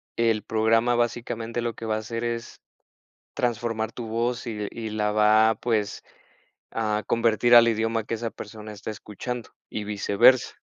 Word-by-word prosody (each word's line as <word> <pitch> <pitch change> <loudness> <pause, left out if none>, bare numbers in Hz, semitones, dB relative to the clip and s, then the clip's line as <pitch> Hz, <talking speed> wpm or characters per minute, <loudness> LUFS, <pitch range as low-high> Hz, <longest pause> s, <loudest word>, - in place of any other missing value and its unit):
el 115 -3 +1
programa 115 +2 +2
básicamente 120 0 -2
lo 120 -1 -2
que 115 - -8
va 110 -1 0
hacer 115 +2 -4
es 115 0 -4 0.7
transformar 115 -2 -1
tu 120 -2 -6
voz 120 +2 -2
y 105 -3 -3
y 115 -1 -6
la 105 -1 -1
va, 110 +1 +5
pues, 110 -4 -1 0.7
a 105 -1 -1
convertir 115 +1 +3
al 115 0 +8
idioma 115 0 0
que 115 - -3
esa 115 +1 -3
persona 105 0 -9
está 105 +1 -6
escuchando 115 +4 -6 0.2
y 105 - -4
viceversa. 105 +4 +3
115 Hz, 150 wpm, -25 LUFS, 110-115 Hz, 0.7 s, al